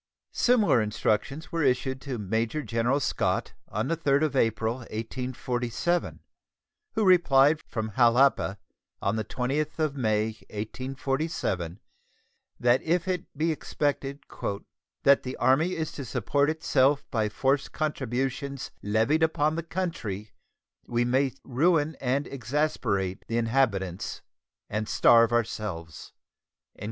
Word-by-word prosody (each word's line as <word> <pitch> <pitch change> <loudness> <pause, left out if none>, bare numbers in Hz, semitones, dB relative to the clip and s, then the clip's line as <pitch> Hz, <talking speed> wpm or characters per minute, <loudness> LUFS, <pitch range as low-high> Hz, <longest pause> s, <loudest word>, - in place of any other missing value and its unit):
Similar 220 - +4
instructions 110 +7 -1
were 165 - -1
issued 130 -1 +1
to 135 -4 -4
Major 110 +8 -1
General 120 +4 +1
Scott - - -1
on 110 +4 -2
the 165 - +1
3d 145 -2 +2
of 150 -3 0
April, 115 -1 +1
1847, 125 +6 -2 0.7
who 220 - +2
replied 155 -5 +5
from 110 -2 -4
Jalapa 120 -3 +4 0.4
on 100 +2 0
the 110 - -1
20th 135 +7 -2
of 155 -3 0
May, 110 -4 +1 0.2
1847, 130 - -3 0.8
that 120 +1 +4
if 170 +2 0
it 180 -2 -2
be 160 +2 +1
expected 145 -2 -2 0.8
"that 140 0 +6
the 130 0 -6
Army 155 +8 +3
is 160 -1 -3
to 140 - -6
support 140 +4 +1
itself 145 -3 +2
by 110 -5 +1
forced 135 +6 0
contributions 135 -1 -2
levied 110 +10 +2
upon 155 -1 +2
the 165 - -1
country 160 - -4 0.6
we 120 0 +1
may 130 +2 +2
ruin 155 +3 +2
and 135 +3 0
exasperate 120 -8 -1
the 115 - -1
inhabitants 115 -7 0 0.4
and 105 +1 -3
starve 115 -1 +5
ourselves." 100 -9 -3
130 Hz, 120 wpm, -27 LUFS, 110-150 Hz, 0.8 s, that